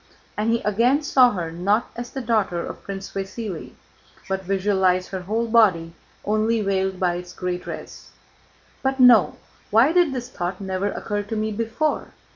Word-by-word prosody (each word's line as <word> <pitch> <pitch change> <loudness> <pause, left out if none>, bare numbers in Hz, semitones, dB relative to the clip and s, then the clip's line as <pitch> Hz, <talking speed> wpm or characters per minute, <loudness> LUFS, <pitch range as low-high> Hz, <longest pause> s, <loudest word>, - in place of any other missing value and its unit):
And 215 +2 0
he 230 - 0
again 240 +8 +2
saw 260 -4 +5
her 170 -4 -4
not 200 +7 0
as 240 0 -6
the 270 - -5
daughter 210 -7 0
of - - -8
Prince 195 0 -7
Vasíli, 195 -1 -5 0.5
but 190 0 -2
visualized 190 -1 +1
her 190 -1 -4
whole 220 +6 -1
body 190 -8 +3 0.3
only 215 +2 +1
veiled 190 -2 -1
by 175 -2 +1
its 180 0 -9
gray 180 -1 -3
dress. - - -9 0.7
"But 265 0 -1
no! 245 -5 +6 0.3
Why 230 +8 +5
did 350 -4 +4
this 250 -2 -4
thought 175 +1 -4
never 190 0 -2
occur 205 -1 -3
to 205 +2 -5
me 215 0 -1
before?" 230 +8 -2
205 Hz, 165 wpm, -23 LUFS, 185-230 Hz, 0.7 s, no